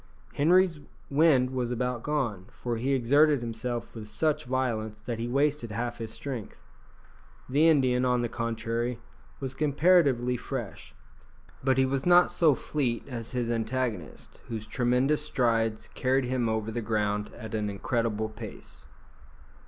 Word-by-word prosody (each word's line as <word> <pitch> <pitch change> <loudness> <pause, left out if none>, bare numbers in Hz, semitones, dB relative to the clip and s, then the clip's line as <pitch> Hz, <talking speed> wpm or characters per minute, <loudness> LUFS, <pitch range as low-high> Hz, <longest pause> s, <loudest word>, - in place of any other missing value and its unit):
Henri's 170 +2 +3 0.3
wind 140 -4 +4
was 125 -2 -1
about 125 0 -2
gone, 120 -11 -2
for 120 -2 -4
he 130 +4 0
exerted 140 +3 +4
himself 120 +1 -4
with 110 -2 -8
such 145 +9 0
violence 115 -4 -2
that 115 +1 -5
he 115 - -2
wasted 140 -1 +1
half 120 +3 -3
his 115 -1 -5
strength. 125 -6 -6 0.9
The 145 +5 +4
Indian, 130 -5 +3
on 125 -1 +2
the - - +1
contrary, 115 +1 -2 0.4
was 135 -1 -4
comparatively 140 -4 +3
fresh, 120 -4 -6 0.7
but 130 -1 +2
he 130 - +4
was 135 0 -1
not 175 0 +6
so 155 -5 +4
fleet 125 -6 -2
as 120 -2 -6
his 120 -2 -1
antagonist, 115 - -3
whose 110 -2 -5
tremendous 125 +5 +1
strides 115 -3 0
carried 130 +1 +1
him 125 -2 0
over 110 0 -1
the 120 +1 -3
ground 105 -2 -1
at 110 -2 -8
an 105 -1 -1
incredible 110 +1 -1
pace. 110 -1 -10
120 Hz, 145 wpm, -28 LUFS, 115-135 Hz, 0.9 s, not